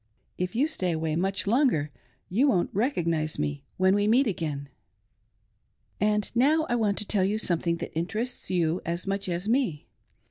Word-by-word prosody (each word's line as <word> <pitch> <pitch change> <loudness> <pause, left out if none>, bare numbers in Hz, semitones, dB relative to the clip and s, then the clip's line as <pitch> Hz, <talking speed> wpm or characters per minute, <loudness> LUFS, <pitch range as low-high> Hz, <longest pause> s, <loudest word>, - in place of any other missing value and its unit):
If 180 +2 -3
you 265 +5 +3
stay 185 - -1
away 160 -1 -1
much 190 +3 -1
longer 215 - +2 0.4
you 240 +10 +2
won't 185 -10 +2
recognise 170 - 0
me 75 -1 -3
when 185 +1 +4
we 205 +1 +2
meet 250 +6 +4
again. 155 - -3 1.3
And 210 +1 0
now 305 +6 +4
I 240 - 0
want 210 -4 +1
to 210 - -2
tell 200 -2 +2
you 200 +3 +1
something 170 -4 0
that - - -6
interests 215 +9 -3
you 175 -1 +1
as 170 +1 -3
much 195 -1 -2
as 175 +3 -2
me. 230 - 0
190 Hz, 170 wpm, -27 LUFS, 170-225 Hz, 1.3 s, when